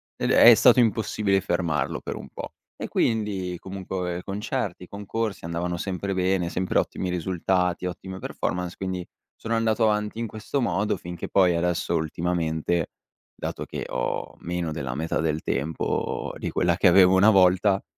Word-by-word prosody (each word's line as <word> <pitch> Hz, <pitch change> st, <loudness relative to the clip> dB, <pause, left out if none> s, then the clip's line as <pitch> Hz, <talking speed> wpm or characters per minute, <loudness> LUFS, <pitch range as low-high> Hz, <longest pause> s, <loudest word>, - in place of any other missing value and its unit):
ed -, -, -2 dB
è 120 Hz, -, +9 dB
stato 125 Hz, +2 st, +6 dB
impossibile 105 Hz, -3 st, +2 dB
fermarlo 85 Hz, -4 st, -1 dB
per -, -, -5 dB
un -, -, -9 dB
po'. -, -, -8 dB, 0.2 s
E -, -, -4 dB
quindi, 100 Hz, -5 st, 0 dB
comunque 95 Hz, -2 st, -4 dB
concerti, 95 Hz, -2 st, -3 dB
concorsi, 105 Hz, 0 st, -4 dB
andavano 85 Hz, +1 st, -2 dB
sempre 95 Hz, +2 st, -3 dB
bene, 95 Hz, -1 st, +1 dB
sempre 90 Hz, +1 st, -1 dB
ottimi 90 Hz, -, -1 dB
risultati, 90 Hz, 0 st, 0 dB
ottime 95 Hz, +1 st, -7 dB
performance, 90 Hz, -1 st, -3 dB
quindi 95 Hz, -1 st, -3 dB, 0.3 s
sono 115 Hz, 0 st, -3 dB
andato 115 Hz, 0 st, +1 dB
avanti 105 Hz, +1 st, -1 dB
in 115 Hz, -, -2 dB
questo 110 Hz, +6 st, -3 dB
modo 105 Hz, -3 st, 0 dB
finché 85 Hz, 0 st, -7 dB
poi 90 Hz, -3 st, +4 dB
adesso 85 Hz, 0 st, 0 dB
ultimamente, 80 Hz, 0 st, -1 dB, 0.4 s
dato -, -, -5 dB
che -, -, -5 dB
ho -, -, -3 dB
meno 85 Hz, -1 st, -3 dB
della 70 Hz, -5 st, -4 dB
metà 80 Hz, +5 st, -2 dB
del 80 Hz, -1 st, 0 dB
tempo 75 Hz, +4 st, -2 dB
di -, -, -4 dB
quella 85 Hz, -1 st, +2 dB
che -, -, +4 dB
avevo 90 Hz, +1 st, +6 dB
una 100 Hz, +4 st, +6 dB
volta, 95 Hz, +1 st, +4 dB
90 Hz, 155 wpm, -25 LUFS, 85-100 Hz, 0.4 s, è